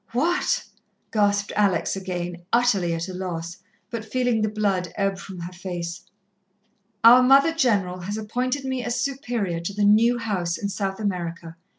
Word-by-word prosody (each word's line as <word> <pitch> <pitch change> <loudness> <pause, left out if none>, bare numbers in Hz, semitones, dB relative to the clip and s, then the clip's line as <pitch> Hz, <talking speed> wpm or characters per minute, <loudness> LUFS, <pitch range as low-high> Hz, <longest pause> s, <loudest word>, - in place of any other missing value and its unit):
"What?" 340 +9 +1 0.5
gasped 205 -1 +1
Alex 195 -5 +2
again, 180 -2 -4
utterly 200 -8 +2
at 165 +2 -3
a 185 - -6
loss, 170 -2 -5 0.3
but 230 -2 -4
feeling 245 0 0
the 215 - +1
blood 195 -5 -1
ebb 195 -1 -1
from 190 -2 -9
her 175 +2 -7
face. 175 -2 -5 1.0
"Our 240 +2 +9
Mother 275 +5 +5
General 205 - +1
has 200 +4 -4
appointed 250 +5 -2
me 260 -1 -2
as 240 0 -2
Superior 240 -10 -2
to 170 +4 -4
the 205 0 +2
new 225 +4 +5
house 185 -7 -2
in 200 - -3
South 195 0 -3
America. 170 -5 -4
200 Hz, 160 wpm, -24 LUFS, 180-240 Hz, 1.0 s, Our